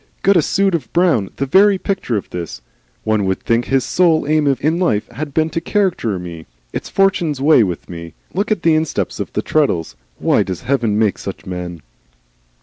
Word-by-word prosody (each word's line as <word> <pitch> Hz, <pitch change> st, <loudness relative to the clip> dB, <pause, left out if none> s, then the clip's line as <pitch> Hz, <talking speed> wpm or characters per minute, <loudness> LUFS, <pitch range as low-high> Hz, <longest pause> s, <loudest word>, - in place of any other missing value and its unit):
"Got 200 Hz, +1 st, +5 dB
a 170 Hz, -, +5 dB
suit 195 Hz, +5 st, +1 dB
of 160 Hz, -7 st, -2 dB
brown, 170 Hz, -, +2 dB
the 140 Hz, -, -1 dB
very 195 Hz, +7 st, +5 dB
picture 185 Hz, -, -2 dB
of 100 Hz, -, -5 dB
this. 85 Hz, -2 st, -6 dB, 0.4 s
One 110 Hz, -1 st, +1 dB
would 95 Hz, 0 st, 0 dB
think 115 Hz, +1 st, +1 dB
his 135 Hz, -1 st, +1 dB
sole 165 Hz, -4 st, +3 dB
aim 155 Hz, -1 st, +2 dB
in 160 Hz, +4 st, +1 dB
life 110 Hz, -, +1 dB
had 145 Hz, +5 st, -6 dB
been 160 Hz, +2 st, 0 dB
to 165 Hz, -, -2 dB
caricature 175 Hz, -, 0 dB
me. 85 Hz, -2 st, -8 dB, 0.3 s
It's -, -, -4 dB
Fortune's 175 Hz, -7 st, +1 dB
way 145 Hz, -1 st, +5 dB
with 90 Hz, -6 st, -2 dB
me. 85 Hz, -2 st, -9 dB, 0.2 s
Look 200 Hz, +4 st, -1 dB
at 210 Hz, -6 st, -1 dB
his 165 Hz, -, +5 dB
insteps 155 Hz, -1 st, -1 dB
on -, -, -2 dB
the -, -, -1 dB
treadles! 110 Hz, -, 0 dB, 0.2 s
Why -, -, +2 dB
does 95 Hz, -3 st, -3 dB
Heaven 120 Hz, -5 st, 0 dB
make 110 Hz, -2 st, +1 dB
such -, -, -7 dB
men?" 90 Hz, -3 st, -6 dB
140 Hz, 195 wpm, -18 LUFS, -, 0.4 s, Got